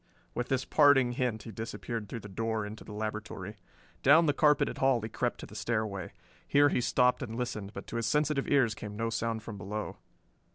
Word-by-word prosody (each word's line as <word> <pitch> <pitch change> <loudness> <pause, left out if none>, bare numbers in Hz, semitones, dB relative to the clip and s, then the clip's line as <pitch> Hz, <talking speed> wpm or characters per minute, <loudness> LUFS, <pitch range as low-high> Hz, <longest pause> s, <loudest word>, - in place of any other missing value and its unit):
With 120 0 -2
this 130 -1 0
parting 145 -4 +5
hint 120 -3 -1
he 115 - -8
disappeared 110 0 -5
through 115 - -5
the 105 - -9
door 110 +2 -2
into 105 +1 -8
the - - -11
laboratory. 105 -1 -5 0.4
Down 160 +5 +6
the 145 - +3
carpeted 150 -1 +3
hall 135 -2 +4
he 110 0 -5
crept 120 +2 -2
to - - -6
the - - -14
stairway. 105 -2 -2 0.4
Here 145 0 +5
he 125 - +1
stopped 125 +1 +3
and 115 -4 -5
listened, 115 -5 -3
but - - -7
to 115 - -5
his 115 -1 0
sensitive 150 +2 +1
ears 130 -6 +3
came 105 -1 -7
no 115 +1 -1
sound 115 -1 -2
from 105 -3 -7
below. 105 +3 -5
115 Hz, 205 wpm, -30 LUFS, 110-130 Hz, 0.4 s, Down